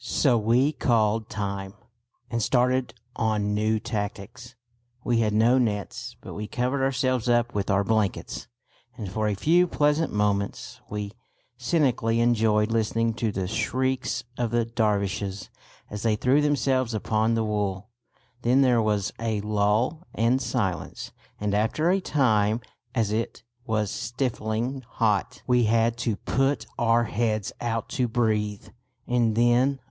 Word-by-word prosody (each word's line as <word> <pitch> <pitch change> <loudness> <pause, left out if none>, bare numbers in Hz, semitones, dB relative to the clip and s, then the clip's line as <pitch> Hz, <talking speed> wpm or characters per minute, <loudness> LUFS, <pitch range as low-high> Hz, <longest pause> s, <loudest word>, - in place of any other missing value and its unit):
So 130 -5 +2
we 120 +6 +3
"called 110 -5 +1
time" 100 -2 -4 0.6
and 115 -1 0
started 125 +1 +1 0.2
on 105 -2 0
new 110 +1 +1
tactics. 105 +3 -5 0.5
We 120 -2 +1
had 110 -2 +2
no 115 +5 +4
nets; 105 -5 -2
but - - -9
we 105 +1 -5
covered 130 +4 -1
ourselves 130 -2 0
up 120 0 +2
with 100 -1 -2
our 100 0 +3
blankets, 105 -2 -1 0.5
and 100 -4 -6
for 110 +2 -1
a 105 - 0
few 170 - +3
pleasant 150 0 +1
moments 100 -1 -1
we 105 -1 -4 0.4
cynically 120 -3 +1
enjoyed 110 -2 +2
listening 115 0 +1
to 115 -1 -1
the 95 -2 -3
shrieks 125 +3 -1 0.2
of 120 -2 0
the 120 0 +1
Dervishes 100 -4 -1 0.4
as 105 0 -5
they 110 -1 +2
threw 130 +7 +3
themselves 135 -5 +1
upon 110 +2 +1
the 115 - +1
wool. 105 -1 -2 0.5
Then 125 +3 +3
there 125 -3 +4
was 105 -3 0
a 110 -2 -1
lull 105 - 0
and 120 +4 +2
silence; 95 - -3 0.3
and 105 -1 -1
after 110 - +1
a 195 +1 +2
time, 110 - +2 0.4
as 110 -4 +1
it 115 +2 -3 0.2
was 105 -2 0
stifling 120 0 -2
hot, 105 -4 0
we 125 -2 +3
had 115 +1 +2
to 115 -2 -1
put 135 +6 0
our 120 0 +3
heads 110 -2 -1
out 115 -1 -2
to 125 - 0
breathe, 105 -3 -1 0.4
and 120 -3 +2
then 120 +4 +3
115 Hz, 140 wpm, -26 LUFS, 105-125 Hz, 0.6 s, no